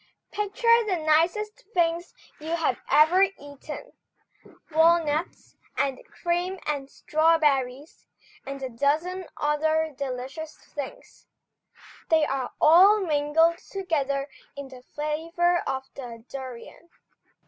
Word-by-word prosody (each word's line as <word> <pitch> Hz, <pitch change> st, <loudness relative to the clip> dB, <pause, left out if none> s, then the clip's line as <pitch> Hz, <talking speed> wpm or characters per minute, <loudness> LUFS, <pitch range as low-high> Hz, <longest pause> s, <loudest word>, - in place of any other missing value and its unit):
Picture 465 Hz, +3 st, +3 dB
the 375 Hz, -3 st, +1 dB
nicest 340 Hz, +9 st, +1 dB
things 340 Hz, 0 st, 0 dB, 0.2 s
you 320 Hz, +2 st, -2 dB
have 330 Hz, -, 0 dB
ever 320 Hz, +5 st, +5 dB
eaten, 365 Hz, -, -3 dB, 0.8 s
walnuts, 320 Hz, 0 st, +2 dB, 0.2 s
and 270 Hz, -2 st, 0 dB
cream 350 Hz, +2 st, -2 dB
and 280 Hz, -2 st, -3 dB
strawberries, 300 Hz, -4 st, +1 dB, 0.4 s
and 275 Hz, 0 st, -7 dB
a 260 Hz, -, -3 dB
dozen 315 Hz, +9 st, -1 dB
other 315 Hz, +1 st, +1 dB
delicious 275 Hz, +3 st, -5 dB
things, 285 Hz, -3 st, -9 dB, 0.8 s
they 320 Hz, -2 st, +4 dB
are 270 Hz, -3 st, -2 dB
all 380 Hz, +7 st, +7 dB
mingled 325 Hz, 0 st, +2 dB
together 285 Hz, -8 st, -2 dB, 0.3 s
in 280 Hz, -1 st, -7 dB
the 255 Hz, -1 st, -12 dB
flavour 330 Hz, +5 st, -1 dB
of 265 Hz, 0 st, -2 dB
the 235 Hz, -4 st, -9 dB
durion. 260 Hz, +5 st, -9 dB
310 Hz, 105 wpm, -26 LUFS, 275-345 Hz, 0.8 s, all